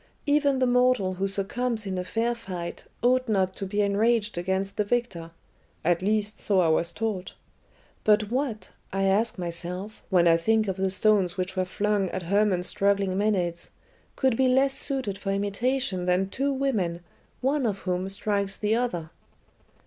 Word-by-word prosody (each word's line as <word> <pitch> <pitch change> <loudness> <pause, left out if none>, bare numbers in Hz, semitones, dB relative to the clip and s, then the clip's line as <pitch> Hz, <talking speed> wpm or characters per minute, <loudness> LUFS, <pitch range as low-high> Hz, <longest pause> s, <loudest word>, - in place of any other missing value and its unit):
Even 285 -2 +3
the 260 - +2
mortal 250 -6 +3
who 190 +2 -1
succumbs 220 +4 -1
in 190 -1 -3
a - - -2
fair 225 +6 0
fight 185 -7 -7 0.2
ought 255 0 +3
not 190 -3 +1
to 195 - -4
be 205 +2 0
enraged 215 +2 +1
against 190 +3 -2
the 210 - +1
victor. 205 -7 -2 0.6
At 175 +1 +2
least, 210 +1 0
so 200 -2 +1
I 170 -3 +3
was 165 +2 +2
taught. 205 -2 -3 0.7
But 210 0 +3
what, 250 -4 -2 0.2
I 195 0 -1
ask 210 +4 +2
myself, 180 +4 -5
when 175 -3 +4
I 165 0 +6
think 220 +5 +2
of 190 -1 -2
the 190 0 +1
stones 195 -2 +2
which 185 0 -3
were 185 -1 0
flung 200 0 0
at 185 - -4
Hermon's 195 0 +2
struggling 195 0 +1
Maenads, 185 -4 -1 0.4
could 260 -4 +2
be 260 +2 +3
less 265 +2 +3
suited 260 -9 -1
for 195 - -2
imitation 205 0 -1
than 180 +2 +1
two 280 +2 0
women, 215 -11 -1 0.4
one 270 0 +1
of 200 -3 -1
whom 185 +1 -2
strikes 200 0 -2
the 210 0 0
other?" 180 -10 -2
200 Hz, 170 wpm, -26 LUFS, 185-230 Hz, 0.7 s, I